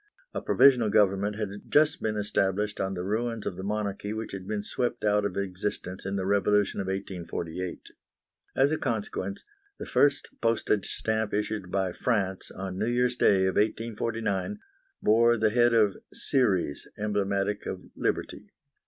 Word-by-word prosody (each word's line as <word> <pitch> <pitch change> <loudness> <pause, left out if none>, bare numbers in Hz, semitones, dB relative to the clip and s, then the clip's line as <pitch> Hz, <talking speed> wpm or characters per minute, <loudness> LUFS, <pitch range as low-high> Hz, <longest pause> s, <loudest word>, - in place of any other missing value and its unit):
A - - -3
provisional 125 -6 +5
government 100 0 +2
had 105 -2 -2 0.2
just 155 +1 +4
been 110 -1 -1
established 105 0 0
on 95 0 -1
the 90 - -3
ruins 115 +3 -2
of - - -3
the 95 - -7
monarchy 105 0 -2
which 110 0 -5
had 95 -1 -7
been 105 -1 -2
swept 120 +1 -2
out 105 0 +3
of 100 -2 -3
existence 95 -1 -4
in 100 - -2
the 95 -1 -1
revolution 100 0 +2
of 95 - -5
1848. 90 -2 -4 0.7
As 135 +2 +4
a 155 - 0
consequence, 100 -5 -3 0.3
the - - -6
first 145 0 +2
postage 115 -3 +1
stamp 110 -2 -1
issued 105 -2 -2
by 95 -1 0
France, 95 -3 -1
on 95 0 -6
New 110 - 0
Year's 120 0 +1
Day 95 -6 +4
of 95 - 0
1849, 110 - -1 0.5
bore 115 +2 +5
the 110 -1 +2
head 120 +1 +4
of 105 -4 +3
Ceres, 95 - +1
emblematic 100 -1 -1
of 95 -1 -5
Liberty. - - -2
105 Hz, 155 wpm, -28 LUFS, 95-110 Hz, 0.7 s, provisional